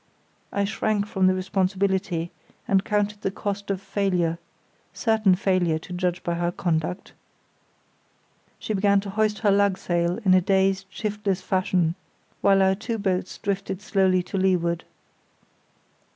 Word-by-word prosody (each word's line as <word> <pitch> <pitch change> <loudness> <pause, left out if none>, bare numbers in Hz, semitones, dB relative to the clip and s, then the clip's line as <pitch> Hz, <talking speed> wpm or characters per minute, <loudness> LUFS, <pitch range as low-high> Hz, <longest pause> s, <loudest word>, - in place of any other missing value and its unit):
I 200 - 0
shrank 210 0 0
from 190 -2 +1
the 185 - +3
responsibility 190 -2 -1 0.4
and 195 -1 +3
counted 210 0 -1
the - - 0
cost 200 +1 -4
of 195 -2 -1
failure—certain 195 +2 -1
failure, 180 -4 +1
to 170 +3 -9
judge 180 0 -1
by 175 - -1
her 175 0 -1
conduct. 175 +1 -2 1.4
She 215 - -4
began 200 0 +3
to 200 -1 -6
hoist 215 +1 +1
her 205 - +6
lugsail 185 -3 +1
in 185 - +6
a 185 - +5
dazed, 195 +1 +1
shiftless 205 -1 -2
fashion, 185 -3 +1 0.5
while 195 -1 +5
our 190 0 +4
two 225 +3 -4
boats 190 -3 -2
drifted 195 -2 -3
slowly 190 -3 +2
to 190 +2 -3
leeward. 175 -3 +1
190 Hz, 135 wpm, -24 LUFS, 180-200 Hz, 1.4 s, her